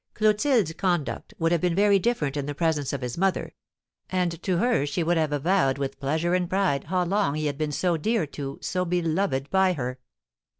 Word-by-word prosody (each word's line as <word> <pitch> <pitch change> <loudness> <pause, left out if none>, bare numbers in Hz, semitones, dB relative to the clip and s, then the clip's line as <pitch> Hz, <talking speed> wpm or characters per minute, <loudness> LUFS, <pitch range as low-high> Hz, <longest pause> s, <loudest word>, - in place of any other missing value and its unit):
Clotilde's 215 - +2
conduct 175 +2 -2
would 165 -3 +1
have 170 -2 +2
been 175 -2 +1
very 200 0 +4
different 175 - 0
in 145 -1 -3
the 145 - -4
presence 155 -3 0
of 140 - -4
his 125 +5 -4
mother, 195 0 0 0.6
and 180 -3 -1
to 185 -3 0
her 240 - +2
she 145 +4 -1
would 175 +2 +2
have 155 -2 +1
avowed 145 -2 +2
with 135 -1 -4
pleasure 160 +5 0
and 180 -1 +1
pride 185 -8 +1
how 180 +3 0
long 195 -4 +1
he 155 0 -2
had 145 -1 -2
been 155 -1 -1
so 175 +3 0
dear 215 +3 0
to, 140 -1 -6
so 180 0 -1
beloved 170 -4 0
by, 190 -1 +3
her. 125 -4 -4
170 Hz, 205 wpm, -26 LUFS, 145-190 Hz, 0.6 s, very